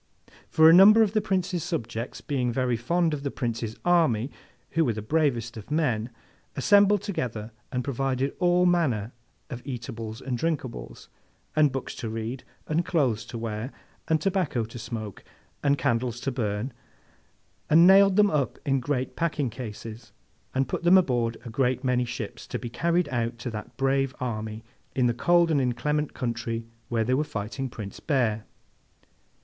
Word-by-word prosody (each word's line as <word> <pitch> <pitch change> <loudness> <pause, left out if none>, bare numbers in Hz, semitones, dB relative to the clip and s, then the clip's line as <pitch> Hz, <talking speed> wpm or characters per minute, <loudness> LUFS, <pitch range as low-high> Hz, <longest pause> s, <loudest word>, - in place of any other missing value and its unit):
For, 160 0 +6
a 165 - +9
number 210 +5 +8
of 210 - +1
the 215 - +2
Prince's 185 -3 -1
subjects, 120 - -4
being 125 -3 -1
very 125 0 0
fond 165 +8 +1
of 145 - -3
the 140 - -2
Prince's 115 -4 -3
army 150 -9 +3 0.4
who 165 - +2
were 120 -7 +1
the 110 - -5
bravest 120 -4 0
of 105 - -10
men, 125 -8 0 0.5
assembled 205 +6 +4
together 115 - -4 0.2
and 125 -2 -1
provided 135 0 -1
all 180 0 +3
manner 135 - +1 0.4
of 125 -1 -5
eatables 115 -4 -6
and 130 -3 -3
drinkables, 145 -6 -4 0.5
and 150 -2 +4
books 135 0 -4
to 115 - -4
read, 115 +3 -4 0.2
and 160 +3 0
clothes 140 -11 +1
to 120 - -7
wear, 115 +2 -4 0.4
and 160 -1 +2
tobacco 165 - 0
to 115 +2 -9
smoke, 110 -3 -6 0.4
and 140 0 +3
candies 120 -1 0
to 135 - -1
burn, 115 0 -2 1.0
and 165 +3 +7
nailed 195 +1 +7
them 205 0 +5
up 145 -4 0
in 135 -2 +2
great 130 0 -2
packing 150 -7 -1
cases, 115 -1 -8 0.4
and 135 0 +1
put - - -3
them 175 +2 +6
aboard 120 -9 +1
a - - -6
great 130 +1 0
many 125 -1 +1
ships, 120 -3 -6
to - - -3
be 120 -2 -7
carried 170 +4 +1
out 120 -2 -2
to 120 +1 -5
that 105 -1 -8
brave 135 0 +1
army 110 -3 -4 0.3
in 130 - +2
the 120 - +3
cold 170 +7 +3
and 145 -3 +3
inclement 145 +5 -1
country 115 -2 -3 0.2
where 115 -2 +1
they 125 +3 0
were 140 +4 +2
fighting 120 +1 -4
Prince 105 -4 -8
Bear. 120 -8 0
130 Hz, 165 wpm, -26 LUFS, 115-160 Hz, 1.0 s, a